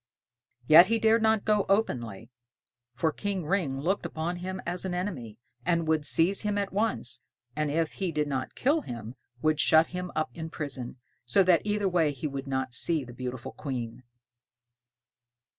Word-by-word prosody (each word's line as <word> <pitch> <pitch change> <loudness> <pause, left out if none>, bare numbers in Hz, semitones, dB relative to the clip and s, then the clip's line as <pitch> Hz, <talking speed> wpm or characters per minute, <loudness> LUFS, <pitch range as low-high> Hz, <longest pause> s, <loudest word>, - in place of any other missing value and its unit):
Yet 160 +7 +9
he 230 - +2
dared 225 +1 +3
not 220 -1 +2
go 210 -2 +3
openly, 125 - -1 0.6
for 160 +5 +1
King 195 -1 -3
Ring 150 -7 0
looked 185 +8 0
upon 170 +1 -3
him 185 +1 -5
as 175 +1 -2
an 185 -2 -2
enemy, 140 - -4 0.3
and 170 +2 +1
would 155 -2 +1
seize 175 +7 +3
him 210 -1 -1
at 200 -1 -2
once, 195 - 0 0.3
and 150 0 0
if 160 +2 0
he 190 -3 -2
did 150 -1 -1
not 135 -2 -3
kill 295 +5 +2
him 115 - -7 0.3
would 155 -1 +2
shut 160 +1 +5
him 180 0 -4
up 155 0 -1
in 160 -1 -6
prison, 135 -6 -5 0.3
so 125 +11 +3
that 180 -2 +4
either 210 -1 +1
way 170 -5 +2
he 135 - -7
would 140 -1 -4
not 130 -2 -2
see 155 +4 +1
the 120 -1 -11
beautiful 125 0 -6
Queen. 125 -5 -5
160 Hz, 175 wpm, -28 LUFS, 135-190 Hz, 0.6 s, Yet